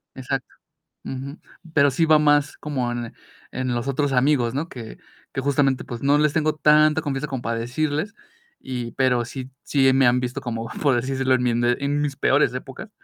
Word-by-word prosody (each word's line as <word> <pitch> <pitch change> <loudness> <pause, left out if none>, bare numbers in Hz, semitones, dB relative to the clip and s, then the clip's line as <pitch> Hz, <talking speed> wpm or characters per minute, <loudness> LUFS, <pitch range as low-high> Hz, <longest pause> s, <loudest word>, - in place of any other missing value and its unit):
Exacto, 130 0 -3 0.6
ujú, 135 +3 -6 0.4
pero 140 -1 +5
sí 165 +5 +1
va 155 -1 +6
más 145 -1 +2
como 130 -5 -2
en 120 -1 -5 0.4
en 130 -1 -2
los 120 +3 -3
otros 140 +1 0
amigos, 125 -2 +2
¿no? 160 +4 -2
Que 115 -3 -9 0.3
que 135 - -2
justamente, 135 -1 +1
pues, 120 0 -7
no 145 +1 +3
les 150 0 +2
tengo 155 -1 +1
tanta 155 +1 +4
confianza 145 -1 -3
como 135 -3 -4
para 115 0 -2
decirles, 155 - -2 0.5
y 125 -3 -5
pero 125 -2 +1
sí 130 +1 -7
sí 135 -2 +3
me 135 -1 +4
han 125 +1 +3
visto 125 0 -4
como, 115 -2 -4
por 140 -4 +3
decírselo, 130 +1 0
en 125 - +1
mi 125 - +2
ende 120 +1 +1
en 145 +1 0
mis 140 -2 -2
peores 135 -1 +2
épocas. 135 +11 -8
135 Hz, 195 wpm, -23 LUFS, 125-145 Hz, 0.6 s, va